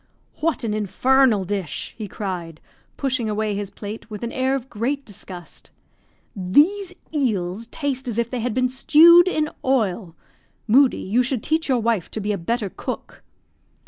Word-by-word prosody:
"What 320 -4 0
an 220 -2 -1
infernal 220 +2 +3
dish!" 190 -3 -4
he 215 -2 -6
cried, 175 -6 -5 0.4
pushing 255 -5 0
away 215 0 -1
his 200 -1 -3
plate 210 +2 -8
with 210 +1 -7
an 235 - -3
air 260 +1 0
of 265 -2 -5
great 265 +5 -2
disgust. 180 -4 -10 0.7
"These 340 - +2 0.2
eels 220 - -1
taste 270 -1 -3
as 230 -2 -2
if 235 -1 +1
they 250 +1 -4
had 235 -1 -2
been 255 0 +2
stewed 335 +7 +7
in 310 -4 +1 0.2
oil. 205 -9 0 0.5
Moodie, 260 +4 +5
you 225 +6 +3
should 250 -2 -1
teach 315 -1 0
your 260 - +3
wife 230 -6 0
to - - -5
be 210 0 -2
a 205 - -1
better 210 +2 -2
cook." - - -7
230 Hz, 165 wpm, -22 LUFS, 205-265 Hz, 0.7 s, stewed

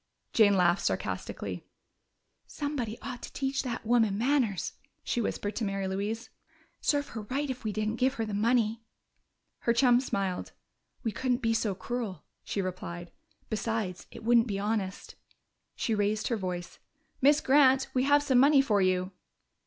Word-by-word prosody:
Jane 205 -3 +5
laughed 175 0 +3
sarcastically. - - -3 0.8
"Somebody 265 -7 -3
ought 250 - -6
to - - -8
teach 270 0 -1
that 235 -4 -4
woman 225 -4 +3
manners," 245 -5 +1 0.3
she 240 - -1
whispered 205 -1 -2
to 230 - -1
Mary 195 -1 -1
Louise. 205 +5 -3 0.5
"Serve 285 -1 +1
her 225 - -6
right 270 +8 -2
if 255 0 -7
we 215 - -1
didn't 215 +2 -2
give 260 +2 +2
her 225 - -1
the 215 - -5
money!" 225 +1 +2 0.8
Her 235 - +2
chum 245 0 +5
smiled. 195 -7 -2 0.5
"We 225 - 0
couldn't 250 +3 -1
be 225 0 +2
so 215 -3 0
cruel," 220 -6 -4 0.2
she 200 - -2
replied. 175 -1 -6 0.4
"Besides, 215 -4 -2
it - - -11
wouldn't 235 +1 +4
be 200 -3 -2
honest." 200 -2 -2 0.6
She 230 - -1
raised 210 +1 0
her 235 - +1
voice. 180 -4 -5 0.4
"Miss 290 +3 +6
Grant, 270 -1 +5
we 255 - +2
have 290 +1 +4
some 265 -4 +4
money 280 +2 +6
for 215 -7 +3
you." 185 0 +1
225 Hz, 160 wpm, -29 LUFS, 200-255 Hz, 0.8 s, Miss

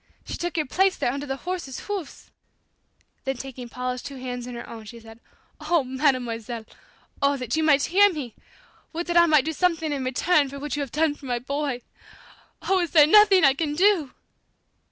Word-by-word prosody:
She - - -7
took 350 0 -4
your 310 - +1
place 380 +7 +1
there - - 0
under 280 +2 -5
the 270 - -2
horses' 345 -3 -5
hoofs!" 390 -8 -7 0.9
Then 270 -1 -2
taking 255 -2 -8
Paula's 250 +1 -4
two 280 - -8
hands 250 -1 -6
in 250 - -7
her 235 - -8
own 225 -2 -10
she 235 +2 -10
said, 225 0 -14 0.4
"Oh, 310 0 +1
Mademoiselle, 245 -4 -1 0.6
oh, 280 0 +2
that 250 -1 -3
you 320 - +1
might 290 -3 +4
hear 405 +3 +5
me! 275 -9 -6 0.6
Would 340 +2 -3
that 345 - -3
I 340 0 +6
might 305 -4 +4
do 320 - -2
something 325 -2 0
in 275 -2 -3
return 280 +3 +2
for 280 - -8
what 295 +1 -4
you 290 - -2
have 275 -4 -5
done 310 0 +1
for 290 -2 -12
my 245 -1 0
boy! 275 0 -3 0.8
Oh, 380 -1 +2
is 345 -2 -1
there 300 -2 +7
nothing 390 0 +6
I 270 - +6
can 295 +1 -2
do?" 360 -5 +3
285 Hz, 200 wpm, -24 LUFS, 255-330 Hz, 0.9 s, there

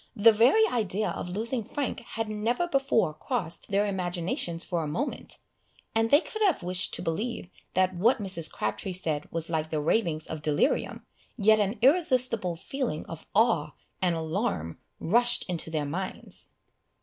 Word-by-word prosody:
The 225 +2 +7
very 245 - +5
idea 215 -3 -1
of - - -5
losing 225 +5 -2
Frank 280 +5 -3
had 225 -1 -4
never 225 +9 0
before 270 - +2
crossed 175 - -3
their 200 +1 +2
imaginations 175 -3 -1
for 175 -2 -2
a 155 - -3
moment, 230 - -4 0.6
and 225 0 +2
they 290 +5 +6
could 435 - -7
have 380 - +3
wished 180 +1 0
to - - -5
believe 190 +3 -3 0.2
that 185 0 +3
what 230 +9 +3
Mrs. 185 -7 +1
Crabtree 110 - -3
said 155 -5 -2
was 165 -1 -2
like 160 -1 -1
the 155 - -1
ravings 155 -1 0
of 160 -1 -6
delirium, 150 -1 0 0.3
yet 215 0 +5
an 205 +2 0
irresistible 255 - +3
feeling 250 - -3
of 165 - -9
awe 195 - +3 0.3
and 180 -2 +2
alarm 160 - -2 0.2
rushed 240 +7 +2
into 170 -3 -3
their 155 -2 -1
minds. 180 +7 -5
190 Hz, 160 wpm, -28 LUFS, 165-235 Hz, 0.6 s, The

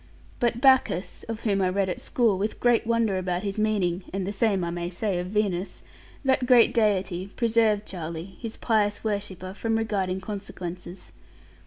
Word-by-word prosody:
But 240 -1 +1
Bacchus 260 -9 +3
(of 225 0 -4
whom 200 -3 +1
I 185 - +2
read 195 +1 0
at 180 - -3
school, 230 -5 +2
with 210 +2 -2
great 240 -1 +3
wonder 230 -5 +2
about 180 0 -2
his 200 +1 -3
meaning 195 -4 +1
and 195 0 -2
the 200 - -3
same 200 -3 +1
I 170 - -2
may 175 0 -3
say 185 0 -1
of 180 - -3
Venus) 200 -2 -1 0.4
that 260 -1 +2
great 245 -3 +6
deity 190 -4 +1
preserved 225 -3 +2
Charlie, 170 +1 -6
his 230 -2 -5
pious 210 -3 +1
worshipper, 200 -3 -3
from 225 +2 -1
regarding 195 -4 -1
consequences. 185 -3 -7
200 Hz, 170 wpm, -26 LUFS, 185-225 Hz, 0.4 s, great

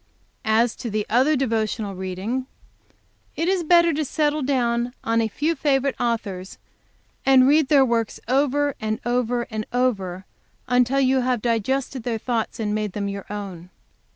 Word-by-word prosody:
"As 225 +2 +2
to 235 - -5
the 210 0 -1
other 260 +7 +4
devotional 220 -5 -1
reading, 190 +8 -4 0.9
it 330 - -1
is 375 -2 +1
better 340 0 +5
to 310 +2 0
settle 300 +1 0
down 245 -2 0
on 230 0 +1
a 225 - +1
few 295 +10 -1
favorite 275 -2 +1
authors, 200 -6 -3 0.7
and 265 -1 +6
read 300 0 +4
their 275 -2 +5
works 230 -3 -1
over 285 +2 +2
and 215 0 -2
over 245 0 0
and 215 0 -3
over 195 -8 -1 0.4
until 250 +2 +2
you 260 -1 +3
have 250 -1 0
digested 250 +4 -1
their 230 0 -2
thoughts 230 0 -2
and 210 -2 -1
made 210 -2 -2
them 200 -1 -2
your 200 -1 -6
own. 190 -4 -7
240 Hz, 155 wpm, -23 LUFS, 215-270 Hz, 0.9 s, and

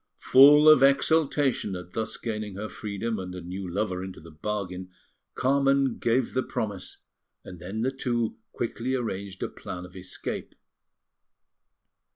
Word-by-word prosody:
Full 145 +3 +7
of 155 -3 +8
exultation 140 -5 +3
at 90 0 -9
thus 110 0 -3
gaining 105 -3 -4
her 105 +2 -5
freedom 105 +1 -4
and 90 -1 -6
a 90 - -6
new 90 +2 -6
lover 95 -1 -2
into 95 -1 -8
the 85 +1 -13
bargain, 95 +1 -4 0.5
Carmen 135 -1 +2
gave 120 +1 +1
the 130 - +1
promise, 100 -6 -4 0.5
and 90 - -10
then 95 +6 -5
the 130 - +1
two 120 -4 -2
quickly 120 +2 -2
arranged 100 -5 -4
a - - 0
plan 90 0 -8
of 90 - -15
escape. 90 -1 -6
110 Hz, 145 wpm, -27 LUFS, 95-130 Hz, 0.5 s, of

